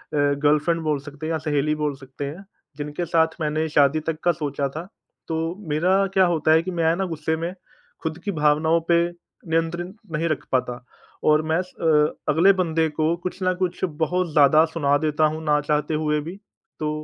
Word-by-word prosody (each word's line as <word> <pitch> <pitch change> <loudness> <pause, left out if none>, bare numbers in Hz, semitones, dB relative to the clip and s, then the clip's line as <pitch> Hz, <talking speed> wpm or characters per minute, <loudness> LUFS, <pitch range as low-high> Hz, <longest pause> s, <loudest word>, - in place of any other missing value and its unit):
Girlfriend 150 +3 +2
बोल 150 -3 0
सकते 145 +2 -9
हैं 165 - -2
या 160 - 0
सहेली 150 +1 +1
बोल 145 -2 -1
सकते 135 +1 -8
हैं, 160 +8 -7 0.3
जिनके 150 +4 -4
साथ 160 0 +2
मैंने 155 +1 0
शादी 145 +1 +3
तक 155 -1 -3
का 175 - +4
सोचा 145 -3 -2
था, 160 +6 -7 0.4
तो 165 +2 -2
मेरा 185 +6 +2
क्या 190 -1 +5
होता 160 -2 +1
है 160 +1 +5
कि 185 - -4
मैं 165 0 +3
ना, 190 +1 -1
गुस्से 160 -2 -2
में 170 +2 -3 0.5
खुद 160 0 -3
की 205 - -2
भावनाओं 155 +2 +3
पे 170 0 +5 0.5
नियंत्रण 165 +2 -1 0.2
नहीं 165 +2 -1
रख 155 - -2
पाता 125 -2 -1 0.4
और 155 0 +5
मैं 165 - +2
स 180 - -20
अ, 150 -2 +3 0.2
अगले 185 +6 +5
बंदे 165 -3 +1
को 155 +2 0
कुछ 180 - -4
न 185 0 +2
कुछ 180 -1 -2 0.2
बहुत 180 0 -1
ज़्यादा 150 +1 +6
सुना 145 -3 +2
देता 155 0 +1
हूँ, 155 +1 -2
ना 150 -1 +2
चाहते 150 +1 -1
हुए 150 -1 0
भी। 170 +6 -8 0.4
तो 155 - -1
155 Hz, 195 wpm, -23 LUFS, 150-170 Hz, 0.5 s, ज़्यादा